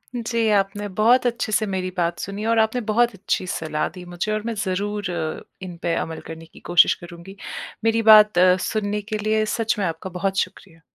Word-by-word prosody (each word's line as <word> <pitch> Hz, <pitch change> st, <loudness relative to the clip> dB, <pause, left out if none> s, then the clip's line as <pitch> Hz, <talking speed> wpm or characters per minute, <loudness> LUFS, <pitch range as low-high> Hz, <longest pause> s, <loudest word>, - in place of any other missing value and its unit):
जी, 230 Hz, -1 st, 0 dB
आपने 205 Hz, 0 st, 0 dB
बहुत 240 Hz, +4 st, +4 dB
अच्छे 235 Hz, -2 st, -2 dB
से 215 Hz, +1 st, +2 dB
मेरी 190 Hz, -2 st, -2 dB
बात 170 Hz, 0 st, 0 dB
सुनी 200 Hz, +2 st, -5 dB
और 230 Hz, 0 st, +2 dB
आपने 220 Hz, +3 st, +2 dB
बहुत 240 Hz, +2 st, +3 dB
अच्छी 190 Hz, -1 st, -2 dB
सलाह 155 Hz, -3 st, -2 dB
दी 180 Hz, +2 st, -11 dB
मुझे 175 Hz, +4 st, -4 dB
और 215 Hz, 0 st, -1 dB
मैं 230 Hz, -, -2 dB
ज़रूर 200 Hz, 0 st, -2 dB
अ, 160 Hz, -2 st, -4 dB, 0.2 s
इनपे 175 Hz, -2 st, -4 dB
अमल 160 Hz, 0 st, -3 dB
करने 165 Hz, 0 st, -9 dB
की 160 Hz, -, -17 dB
कोशिश 175 Hz, -1 st, +4 dB
करूँगी। 175 Hz, +3 st, -11 dB, 0.5 s
मेरी 225 Hz, 0 st, +2 dB
बात 210 Hz, -3 st, +7 dB
अ, 180 Hz, 0 st, +6 dB
सुनने 210 Hz, -1 st, -2 dB
के 215 Hz, +1 st, -4 dB
लिए 215 Hz, +1 st, +1 dB
सच 225 Hz, -1 st, 0 dB
में 195 Hz, -, 0 dB
आपका 165 Hz, +3 st, -4 dB
बहुत 195 Hz, +1 st, -1 dB
शुक्रिया। 165 Hz, -4 st, -5 dB
200 Hz, 195 wpm, -22 LUFS, 175-215 Hz, 0.5 s, बात